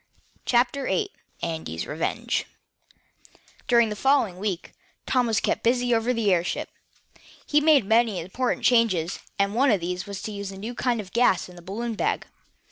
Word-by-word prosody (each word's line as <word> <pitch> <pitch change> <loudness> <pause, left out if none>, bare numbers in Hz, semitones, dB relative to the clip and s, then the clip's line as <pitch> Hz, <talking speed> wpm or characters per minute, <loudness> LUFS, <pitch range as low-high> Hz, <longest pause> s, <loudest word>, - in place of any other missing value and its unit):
CHAPTER 250 +3 +2
VIII 420 -3 0 0.3
ANDY 160 - -4
FOGER'S 85 - -3
REVENGE 155 +2 -2 1.2
During 235 -2 +4
the 210 - -3
following 230 -6 +2
week, 195 -3 -3 0.3
Tom 250 -2 +2
was 225 -1 +2
kept - - 0
busy 245 +1 +2
over 230 +2 +2
the 225 -5 +2
airship. 175 0 -1 0.7
He 295 0 +3
made 295 -7 +5
many 220 -2 +3
important 215 +9 -2
changes, 200 -9 +3 0.2
and 200 0 +1
one 265 +5 +3
of 210 -5 +3
these 180 +2 -4
was 200 -1 -6
to 215 - -4
use 200 -1 -5
a 195 - -9
new 220 +5 -5
kind 245 -1 0
of 190 -2 -13
gas 235 -7 +3
in 180 - -13
the 175 - -12
balloon 225 +6 -4
bag. 215 - -1
220 Hz, 175 wpm, -25 LUFS, 185-245 Hz, 1.2 s, made